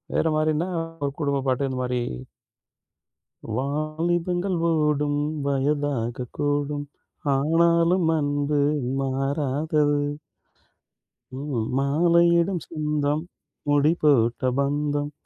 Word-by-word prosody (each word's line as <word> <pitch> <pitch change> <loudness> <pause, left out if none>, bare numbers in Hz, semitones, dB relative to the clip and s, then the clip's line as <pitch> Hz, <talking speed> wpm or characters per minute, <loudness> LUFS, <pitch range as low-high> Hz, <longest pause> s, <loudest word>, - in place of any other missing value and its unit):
வேற 160 - +2
மாரின்னா, 155 +3 +1 0.4
ஒரு 140 - -1
குடும்பப்பாட்டு, 140 -1 0
இந்த 130 - -4
மாரி. 125 0 -1 1.6
'வாலிபங்கள் 170 +6 -1
ஓடும் 150 -2 +1 0.3
வயதாகக் 135 -3 -1
கூடும், 145 0 -1 0.5
ஆனாலும் 170 +4 +3
அன்பு 145 0 0 0.4
மாறாதது.' 145 +2 0 1.4
ம், 130 -6 -2
'மாலையிடும் 170 +4 +3
சொந்தம் 150 -1 -1 0.5
முடி 145 +2 +4
போட்ட 120 -5 +3 0.2
பந்தம், 145 +1 0
145 Hz, 75 wpm, -24 LUFS, 140-160 Hz, 1.6 s, முடி